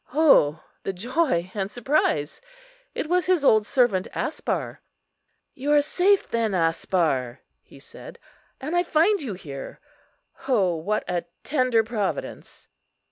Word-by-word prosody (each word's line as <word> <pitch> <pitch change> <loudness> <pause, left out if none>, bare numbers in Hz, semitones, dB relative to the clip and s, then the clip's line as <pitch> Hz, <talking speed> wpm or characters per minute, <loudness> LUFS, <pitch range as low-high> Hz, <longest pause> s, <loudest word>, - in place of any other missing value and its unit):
O 165 - +4 0.2
the 195 - -4
joy 215 - -1
and 195 -2 -3
surprise! 230 - 0 0.5
it - - -3
was 355 0 +1
his 360 -6 +2
old 215 -4 +4
servant 235 -8 +2
Aspar. - - -3 0.7
"You 280 +3 -3
are 295 - +6
safe, 380 +6 +2
then, 225 -4 -1
Aspar," 165 -6 0 0.2
he - - -18
said, - - -13 0.4
"and 305 +6 -4
I 350 - +4
find 350 +4 +2
you 235 -9 -5
here. 140 -7 -9 0.7
O 195 -10 +2
what 200 +7 -2
a 175 -1 -2 0.2
tender 255 -5 +2
Providence!" 215 -3 -5
220 Hz, 130 wpm, -24 LUFS, 180-295 Hz, 0.7 s, are